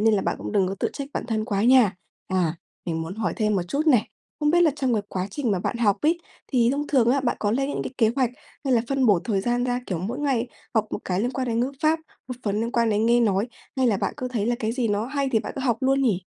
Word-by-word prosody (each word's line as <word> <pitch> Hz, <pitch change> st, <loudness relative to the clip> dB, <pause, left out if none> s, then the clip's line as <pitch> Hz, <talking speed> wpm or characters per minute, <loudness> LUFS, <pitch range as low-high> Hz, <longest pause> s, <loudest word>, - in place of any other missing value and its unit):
nên 220 Hz, 0 st, +4 dB
là 195 Hz, -, +1 dB
bạn -, -, -1 dB
cũng -, -, -5 dB
đừng 195 Hz, -3 st, +2 dB
có 195 Hz, -, -3 dB
tự -, -, +1 dB
trách 280 Hz, -1 st, -5 dB
bản -, -, -2 dB
thân 220 Hz, -3 st, -1 dB
quá 205 Hz, -3 st, -1 dB
nha. 240 Hz, -5 st, +5 dB, 0.3 s
À, 180 Hz, -4 st, +1 dB, 0.3 s
mình 165 Hz, -2 st, -2 dB
muốn 165 Hz, +3 st, -5 dB
hỏi 220 Hz, +1 st, -1 dB
thêm 215 Hz, -2 st, +1 dB
một 180 Hz, -, +1 dB
chút 295 Hz, -, -1 dB
này, 250 Hz, -8 st, +4 dB, 0.3 s
không 295 Hz, 0 st, +3 dB
biết 345 Hz, +2 st, +4 dB
là 325 Hz, -, +5 dB
trong 260 Hz, -4 st, 0 dB
cái 210 Hz, -, 0 dB
quá 185 Hz, 0 st, -2 dB
trình 245 Hz, +2 st, -1 dB
mà 195 Hz, -, +1 dB
bạn 235 Hz, -, -2 dB
học 210 Hz, -4 st, +3 dB
ấy, 330 Hz, +3 st, +2 dB, 0.3 s
thì 240 Hz, -3 st, +4 dB
thông 285 Hz, +2 st, -1 dB
thường 250 Hz, -5 st, +3 dB
á, 275 Hz, +2 st, +3 dB
bạn 250 Hz, -2 st, 0 dB
có 205 Hz, -, +1 dB
lên 270 Hz, +5 st, 0 dB
những -, -, -2 dB
cái -, -, -5 dB
kế 225 Hz, -3 st, +4 dB
hoạch 255 Hz, -3 st, +2 dB, 0.3 s
hay 270 Hz, -, +1 dB
là 235 Hz, -, +4 dB
phân 270 Hz, -2 st, +2 dB
bổ 200 Hz, -5 st, +5 dB
thời 205 Hz, -5 st, 0 dB
gian 240 Hz, +4 st, 0 dB
ra, 245 Hz, 0 st, 0 dB
kiểu, 180 Hz, -, -2 dB
mỗi 220 Hz, +10 st, -4 dB
ngày 270 Hz, -5 st, 0 dB, 0.3 s
học 220 Hz, -1 st, +2 dB
một -, -, -2 dB
cái 185 Hz, 0 st, 0 dB
liên 240 Hz, +3 st, 0 dB
quan 260 Hz, -1 st, -2 dB
đến 230 Hz, 0 st, +1 dB
ngữ 255 Hz, +3 st, 0 dB
pháp, 315 Hz, +1 st, +3 dB, 0.3 s
một 250 Hz, -, -3 dB
phần 205 Hz, 0 st, 0 dB
liên 230 Hz, +1 st, -2 dB
quan 235 Hz, -1 st, +2 dB
đến 215 Hz, +2 st, +2 dB
nghe 240 Hz, +1 st, +4 dB
nói, 210 Hz, 0 st, +2 dB, 0.3 s
hay 260 Hz, -1 st, +3 dB
là 220 Hz, -4 st, +3 dB
bạn -, -, -2 dB
cứ 255 Hz, -, -3 dB
thấy 225 Hz, -4 st, -1 dB
là 240 Hz, -, +2 dB
cái 220 Hz, -1 st, -1 dB
gì 245 Hz, -2 st, 0 dB
nó 210 Hz, +2 st, 0 dB
hay 275 Hz, 0 st, -1 dB
thì 225 Hz, -, +4 dB
bạn -, -, -5 dB
cứ -, -, -2 dB
học 240 Hz, -4 st, +2 dB
luôn 270 Hz, +1 st, +2 dB
nhỉ? 205 Hz, -8 st, +1 dB
235 Hz, 305 wpm, -24 LUFS, 210-260 Hz, 0.3 s, nha